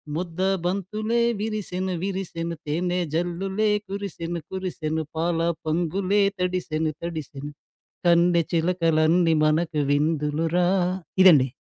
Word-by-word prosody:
ముద్దబంతులే 190 +6 -1 0.2
విరిసెను 190 -4 -3
విరిసెను, 170 -4 -3
తేనె 175 +4 -1
జల్లులే 190 +5 0 0.2
కురిసెను 180 -4 -4
కురిసెను, 165 -4 -3
పాల 165 +1 0 0.3
పొంగులే 180 +5 +1 0.2
తడిసెను 175 -4 -1
తడిసెను 150 -4 -6 0.6
కన్నె 170 0 +4
చిలకలన్నీ 165 -1 +3
మనకు 155 0 +1
విందులు 150 +1 +1
రా 180 0 +3 0.5
ఇదండీ. 150 -8 +7
175 Hz, 90 wpm, -24 LUFS, 160-185 Hz, 0.6 s, ఇదండీ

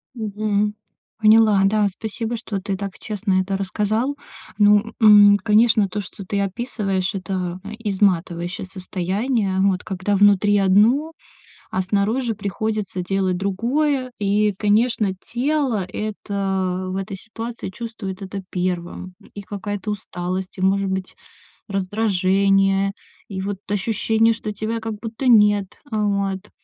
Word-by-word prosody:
Мгм, 210 -1 -1 0.4
поняла, 215 -2 +5
да, 210 0 +3
спасибо, 225 +4 -4
что 205 -4 -5
ты 195 -1 -3
так 200 -1 -6
честно 205 -3 0
это 195 +1 -2
рассказал. 215 +7 -1 0.4
Ну, 210 +1 +4
м, 205 -1 +8
конечно, 220 -1 +4
то, 210 - -3
что 195 +1 -10
ты 200 +1 -2
описываешь- 195 -2 -2
это 185 -2 -3 0.2
изматывающее 185 -4 0
состояние, 190 +3 -2
вот. 190 -2 +2
Когда 195 +1 -1
внутри 205 +1 +4
одно, 215 +11 +4 0.6
а 185 - 0
снаружи 215 +5 0
приходится 210 -1 -3
делать 190 0 0
другое. 255 +7 0
И, 205 +1 +2
конечно, 210 -1 +2
тело 255 -5 -1
это 190 -2 -3
в 190 - -3
этой 195 0 -4
ситуации 225 0 -7
чувствует 210 -3 -7
это 195 0 -6
первым. 180 0 -3 0.2
И 205 - -7
какая-то 205 +1 -5
усталость, 185 -1 -4
и, - - -5
может 195 +1 +2
быть, 190 -1 -4 0.5
раздражение, 195 -1 +2 0.4
и 190 -2 -5
вот 195 0 -3
ощущение, 225 +2 +2
что 215 -1 -5
тебя 220 +2 -3
как 225 -1 -4
будто 230 +3 -5
нет. 205 -4 +4
Вот. 200 -3 -1
205 Hz, 125 wpm, -21 LUFS, 190-220 Hz, 0.6 s, м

